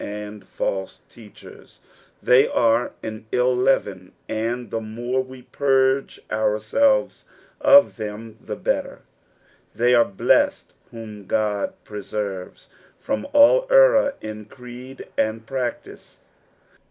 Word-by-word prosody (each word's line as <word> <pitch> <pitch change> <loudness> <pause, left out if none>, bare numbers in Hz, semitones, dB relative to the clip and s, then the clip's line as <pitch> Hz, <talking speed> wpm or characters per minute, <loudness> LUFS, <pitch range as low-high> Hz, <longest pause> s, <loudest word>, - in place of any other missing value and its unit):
and 105 0 -7
false 95 -1 -4
teachers; 110 -3 -15 0.4
they 125 +2 +5
are 115 +1 +1
an 110 -1 -6
ill 125 0 +2
leaven, 105 -8 0 0.2
and 115 +3 -3
the 115 - -2
more 120 +4 -3
we 130 -1 -13
purge 135 0 +1
ourselves 110 - +1 0.3
of 280 - +6
them 110 0 -7
the - - -6
iHittej: - - -2 0.8
thev 120 +1 +3
are 120 - +6
blessed 95 - +1 0.2
whom 105 -4 -10
God 105 -2 -1
preserves 100 -2 -6 0.3
from 105 - -3
all 295 +14 +5
error - - +5
in 110 -1 -7
creed 125 +3 -11
and 110 +1 -1
practice. 125 0 -6
115 Hz, 110 wpm, -22 LUFS, 105-130 Hz, 0.8 s, of